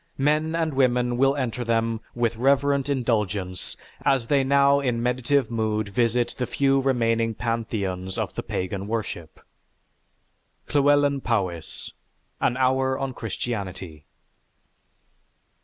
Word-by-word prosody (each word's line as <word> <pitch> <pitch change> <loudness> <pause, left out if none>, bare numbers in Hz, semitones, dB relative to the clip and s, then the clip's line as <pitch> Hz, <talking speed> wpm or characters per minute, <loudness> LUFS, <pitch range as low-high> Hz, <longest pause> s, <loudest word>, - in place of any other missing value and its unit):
Men 150 +3 +1
and 160 -2 0
women 125 -2 +2
will 135 +2 +3
enter 125 -3 -2
them 115 -1 0
with 120 -1 0
reverent 140 +3 +2
indulgence 105 -8 -1 0.2
as 135 -4 +2
they 140 +2 +2
now 140 +1 +4
in 120 -4 -1
meditative 125 +1 +1
mood 110 -2 -1
visit 120 +3 +1
the 125 - -1
few 135 -1 +2
remaining 115 -4 +1
pantheons 100 -6 -3
of - - -2
the - - -3
pagan 95 +2 -4
worship." 105 -8 -4 1.3
(Llewelyn 145 -1 +3
Powys: 95 -10 -3 0.5
"_An 120 - +1
Hour 130 0 +2
On 135 -1 -3
Christianity. 95 -9 -5
120 Hz, 115 wpm, -24 LUFS, 110-135 Hz, 1.3 s, now